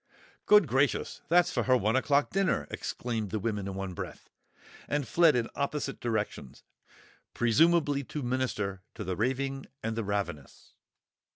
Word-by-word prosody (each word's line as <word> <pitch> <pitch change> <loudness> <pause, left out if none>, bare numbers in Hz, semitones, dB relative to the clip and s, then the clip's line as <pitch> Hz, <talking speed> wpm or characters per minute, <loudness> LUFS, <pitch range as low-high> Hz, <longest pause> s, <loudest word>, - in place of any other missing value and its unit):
"Good 210 -3 +7
gracious, 135 +4 0
that's 175 +1 +4
for - - +1
her 130 -1 +5
one 110 +2 +1
o'clock 140 +2 +2
dinner!" 195 0 +1
exclaimed 115 -3 -3
both - - -13
the - - +1
women 105 -2 -2
in 95 - -5
one 95 -1 -4
breath, - - -8 0.6
and 145 -3 -1
fled 165 -4 +5
in 120 -1 +1
opposite 140 -1 -3
directions, 110 - -3 0.7
presumably 145 +4 +3
to 150 +2 -5
minister 120 -6 -2
to - - -5
the 90 0 -3
raving 135 +5 -1 0.2
and 115 0 -2
the 115 - -2
ravenous! 100 -9 -4
125 Hz, 155 wpm, -29 LUFS, 105-145 Hz, 0.7 s, Good